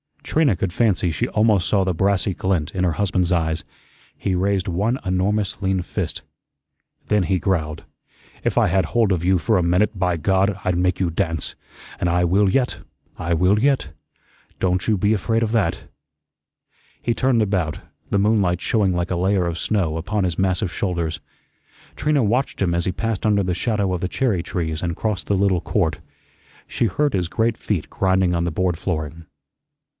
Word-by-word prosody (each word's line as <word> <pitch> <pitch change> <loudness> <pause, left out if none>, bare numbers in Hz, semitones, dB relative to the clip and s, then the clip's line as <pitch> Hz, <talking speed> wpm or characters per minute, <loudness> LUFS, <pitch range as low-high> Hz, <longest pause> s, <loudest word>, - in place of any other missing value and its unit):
Trina 150 -7 +2
could 95 0 -2
fancy 100 -6 +2
she 80 - -1
almost 105 -4 +2
saw 100 -2 +2
the 95 -1 0
brassy 95 +2 +1
glint 90 -5 -1
in 90 -1 0
her 85 - +1
husband's 90 0 0
eyes. 80 -2 0 0.5
He 95 - -1
raised 95 +1 0
one 100 +8 0
enormous 95 +3 0
lean 95 -1 +1
fist. 90 - -4 0.9
Then 105 -2 +2
he 95 +1 +1
growled: 80 -5 -1 0.6
"If - - -1
I - - +5
had 95 0 +2
hold 115 +3 +1
of 90 -2 0
you 95 0 +4
for 110 +5 +1
a 90 - +2
minute, 95 +4 +1
by 90 -2 +1
God, 95 +4 +1
I'd 90 -1 0
make 90 0 +1
you 90 -2 +1
dance. 80 -2 -2 0.5
An' 90 - 0
I 90 +1 +2
will 95 +3 +3
yet, 125 +5 0 0.4
I 85 +1 -1
will 90 +5 +3
yet. 135 - +1 0.7
Don't 90 -1 0
you 110 -2 +3
be 105 +3 +2
afraid 115 +3 0
of 110 - -1
that." 105 -8 0 1.2
He 120 - +1
turned 125 -1 +2
about, 95 -7 -1 0.3
the - - +1
moonlight 100 -4 +2
showing 100 -5 +1
like 90 +1 -1
a 90 - 0
layer 95 0 +1
of 85 -1 -3
snow 90 -7 0
upon 100 +5 -1
his 90 -2 -1
massive 95 0 +1
shoulders. 85 -4 -2 0.8
Trina 150 -3 +2
watched 120 +4 0
him 90 -3 +2
as 85 0 0
he 95 - +1
passed 110 +3 -3
under 105 -2 +3
the 90 -1 -1
shadow 100 0 0
of 90 - -3
the 90 - 0
cherry 110 -4 0
trees 80 -3 -3
and 85 -2 -2
crossed 105 -3 -2
the 100 - +1
little 95 -3 +2
court. 85 -9 0 0.7
She - - 0
heard 145 +5 0
his 90 -3 0
great 115 +5 0
feet 95 -8 -2
grinding 95 -2 +1
on 85 0 0
the 85 - -1
board 90 0 -1
flooring. 80 -3 -4
95 Hz, 185 wpm, -22 LUFS, 85-105 Hz, 1.2 s, I